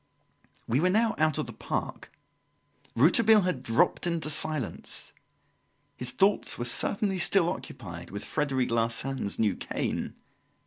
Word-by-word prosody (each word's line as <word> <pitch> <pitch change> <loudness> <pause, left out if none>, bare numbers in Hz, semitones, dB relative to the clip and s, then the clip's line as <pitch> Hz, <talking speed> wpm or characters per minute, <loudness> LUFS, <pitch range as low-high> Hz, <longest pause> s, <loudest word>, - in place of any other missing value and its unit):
We 120 +4 +2
were 180 +4 +3
now 220 +4 +2
out 155 -1 +2
of - - -1
the - - -8
park. - - -5 0.8
Rouletabille 210 - +5
had 180 -8 -1
dropped 130 +9 +1
into 165 -3 -1
silence. 150 -6 -2 0.8
His 125 - -5
thoughts 195 +11 +2
were 120 - -3
certainly 195 - +1
still 175 0 +4
occupied 85 - -6
with 100 +2 -6
Frederic 135 -5 -1
Larsan's 115 0 -1
new 105 -4 +1
cane. - - -3
145 Hz, 130 wpm, -28 LUFS, 115-180 Hz, 0.8 s, Rouletabille